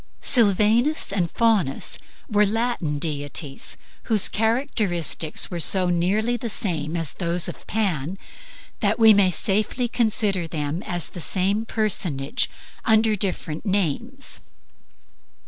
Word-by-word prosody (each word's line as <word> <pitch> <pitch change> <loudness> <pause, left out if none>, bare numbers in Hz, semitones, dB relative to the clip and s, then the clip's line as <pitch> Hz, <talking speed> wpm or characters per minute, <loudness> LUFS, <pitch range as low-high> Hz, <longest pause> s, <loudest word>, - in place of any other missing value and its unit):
Sylvanus 225 - +3
and 180 -4 0
Faunus 215 - +1 0.3
were 210 -5 +3
Latin 215 -8 -1
divinities, 145 -1 -3 0.3
whose 215 -3 +3
characteristics 215 - 0
are 175 - -4
so 180 +2 +4
nearly 200 +7 +1
the 235 0 -4
same 165 -6 -2
as 165 -4 -2
those 170 -1 +2
of - - -8
Pan 190 -6 -1 0.6
that 210 0 +1
we 225 -2 +7
may 200 -2 +4
safely 215 +7 0
consider 215 -6 0
them 155 +1 -4
as 175 -2 -1
the 180 - -9
same 200 +6 +1
personage 170 -12 -1 0.3
under 220 -1 +3
different 180 -5 -3
names. 205 - -1
195 Hz, 115 wpm, -23 LUFS, 170-220 Hz, 0.6 s, we